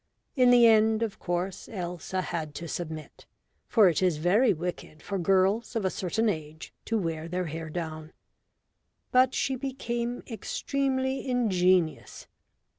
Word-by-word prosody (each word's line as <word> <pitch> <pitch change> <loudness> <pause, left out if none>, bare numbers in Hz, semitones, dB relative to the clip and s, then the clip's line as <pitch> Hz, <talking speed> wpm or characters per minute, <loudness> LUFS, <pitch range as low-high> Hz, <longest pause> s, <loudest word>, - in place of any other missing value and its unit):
In 250 -3 +5
the 245 -1 +7
end, 220 0 +4
of 220 -3 -4
course, 180 +1 -3
Elsa 180 -1 -4
had 155 -5 -4
to 170 - -6
submit, 160 -3 -7 0.4
for 215 -4 +5
it 170 -1 +1
is 180 -4 +2
very 195 +10 +3
wicked 170 -3 -5
for 200 -1 -3
girls 195 +6 +2
of 220 -4 -1
a 190 - +1
certain 220 +5 -1
age 155 -5 -4
to 225 - 0
wear 165 -4 -3
their 180 +1 -2
hair 160 0 -5
down. 155 -1 -5 1.0
But 255 +1 +4
she 265 - 0
became 245 -2 -3
extremely 265 +3 -2
ingenious. 185 -8 +1
185 Hz, 140 wpm, -28 LUFS, 170-235 Hz, 1.0 s, the